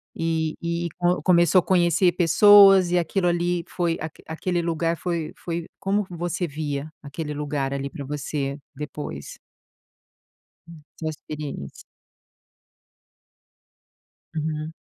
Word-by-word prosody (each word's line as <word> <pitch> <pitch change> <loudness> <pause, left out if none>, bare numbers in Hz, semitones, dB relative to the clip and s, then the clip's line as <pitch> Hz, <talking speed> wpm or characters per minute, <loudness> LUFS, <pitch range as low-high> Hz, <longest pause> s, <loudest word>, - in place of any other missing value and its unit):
e 160 -1 -1
e 170 0 -1
co 180 0 +1
começou 175 0 +5
a - - -9
conhecer 175 0 +3
pessoas 195 +1 +7
e 180 - +3
aquilo 175 +2 0
ali 175 0 0
foi 170 -2 -1
a 160 0 -4 0.2
aquele 175 +2 -1
lugar 165 0 0
foi 170 -3 -3
foi 170 -1 -4
Como 200 +1 0
você 175 +1 -2
via 145 0 -4
aquele 150 +1 -5
lugar 145 -2 -2
ali 140 0 -3
para 140 - -7
você 140 0 -3 0.2
depois? 145 - -7 1.3
Hum. 165 -3 -13
Sua 160 - -4
experiência. 150 - -7 2.5
Uhum. 155 0 -3
165 Hz, 115 wpm, -24 LUFS, 150-175 Hz, 2.5 s, pessoas